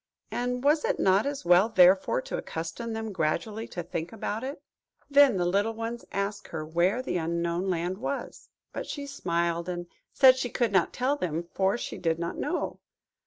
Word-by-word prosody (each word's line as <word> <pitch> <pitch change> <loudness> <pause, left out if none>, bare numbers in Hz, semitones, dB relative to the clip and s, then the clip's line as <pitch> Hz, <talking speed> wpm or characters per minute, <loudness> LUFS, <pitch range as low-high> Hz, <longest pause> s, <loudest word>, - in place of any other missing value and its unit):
and 250 +1 -2
was 300 +2 +3
it - - 0
not 195 +5 +3
as 280 -8 -4
well, 180 +5 +5
therefore, 190 - +4
to - - -5
accustom 165 +8 -5
them 220 -1 -4
gradually 190 +6 -2
to 175 - -5
think 170 0 -4
about 220 +1 -4
it? 275 +3 -5 0.5
Then 280 -6 +6
the 175 - +1
little 200 +5 +1
ones 230 +1 -5
asked 200 +1 -3
her 155 -2 -5
where 175 +10 +1
the 180 - -1
Unknown 170 +2 -1
Land 180 +2 -1
was. 275 +3 -5 0.2
But - - -5
she 285 -1 -5
smiled, 170 -9 -1
and 175 -1 -4 0.3
said 260 -2 +7
she 250 -1 -2
could 235 -3 0
not 190 -4 +3
tell 265 +4 0
them, 170 - -2
for 195 +3 +2
she - - -6
did 165 -2 0
not 170 0 -3
know. - - -2
195 Hz, 185 wpm, -28 LUFS, 170-240 Hz, 0.5 s, said